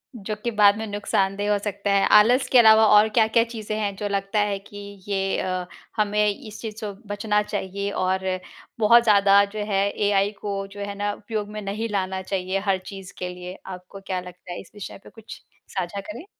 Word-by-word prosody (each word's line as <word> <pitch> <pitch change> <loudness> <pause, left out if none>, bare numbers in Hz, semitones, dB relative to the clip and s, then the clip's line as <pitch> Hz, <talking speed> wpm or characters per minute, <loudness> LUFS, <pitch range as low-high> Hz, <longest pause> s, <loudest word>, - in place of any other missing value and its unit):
जो 215 -1 -5
कि 235 - -1
बाद 205 0 +6
में 220 - -4
नुकसानदेह 205 0 0
हो 205 - +3
सकता 200 -1 -2
है। 200 0 +4
आलस 245 +5 +4
के 255 - +6
अलावा 220 -1 +7
और 215 +1 +6
क्या-क्या 225 +1 +4
चीज़ें 220 -2 -5
हैं, 200 -2 -2
जो 205 +1 -3
लगता 200 +1 -1
है 205 -1 +1
कि 205 +1 -14 0.3
ये 195 -1 0
अ, 185 -1 -2 0.3
हमें 210 0 +2
इस 210 +1 -7
चीज़ 220 -2 -6
सो 210 -2 -5
बचना 210 0 0
चाहिए? 200 -1 -3
और 190 0 -1 0.5
बहुत 235 +2 +6
ज़्यादा 200 -2 +5
जो 215 - -3
है, 195 +1 +2
एआई 205 0 +1
को 205 -1 -3
जो 195 +1 -12
है 200 0 -4
ना 205 0 -1
उपयोग 210 0 -5
में - - -4
नहीं 210 +3 -3
लाना 190 -2 -2
चाहिए 190 0 -2
हर 190 - +3
चीज़ 195 -1 -9
के 180 - -3
लिए। 180 +1 -8
आपको 185 +1 -9
क्या 185 -1 -1
लगता 180 0 -11
है? 175 - -5
इस - - -18
विषय 205 - -8
पे - - -13
कुछ 225 -1 -12 0.4
साझा 185 +2 -2
करें। 215 - -9
205 Hz, 205 wpm, -24 LUFS, 195-210 Hz, 0.5 s, अलावा